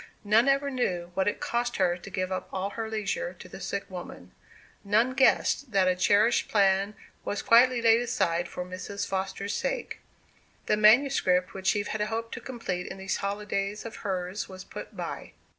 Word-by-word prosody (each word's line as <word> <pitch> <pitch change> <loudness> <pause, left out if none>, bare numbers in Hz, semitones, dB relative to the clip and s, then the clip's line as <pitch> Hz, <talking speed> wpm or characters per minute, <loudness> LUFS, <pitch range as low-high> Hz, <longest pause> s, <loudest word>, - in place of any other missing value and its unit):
None 220 +4 +4
ever 275 +1 +2
knew 180 -9 -2
what 190 +1 0
it 205 - 0
cost 240 0 -1
her 180 -2 +2
to 180 +2 -10
give 185 -1 -3
up 185 - -3
all 195 +1 -2
her 225 0 -4
leisure 220 - -2
to - - -12
the - - -10
sick - - -3
woman; - - -9 0.5
none 220 +5 +2
guessed 265 -1 +2
that 190 -2 +4
a 185 - +3
cherished 205 +5 +3
plan 200 0 +2 0.3
was 205 - -3
quietly 240 +1 +5
laid 230 0 +5
aside 175 -8 0
for 180 - -6
Mrs. 185 +2 -5
Foster's 195 +1 -3
sake. - - -3 0.7
The - - +2
manuscript 210 -5 +4
which 190 +1 0
Eve 205 0 -2
had 220 - -2
hoped 225 +2 -2
to - - -6
complete 210 -8 -4
in - - -7
these 190 0 -2
holidays 200 +1 -3
of 225 - -7
hers 190 0 -3
was 185 0 -9
put - - -9
by. - - -6
205 Hz, 180 wpm, -28 LUFS, 190-230 Hz, 0.7 s, quietly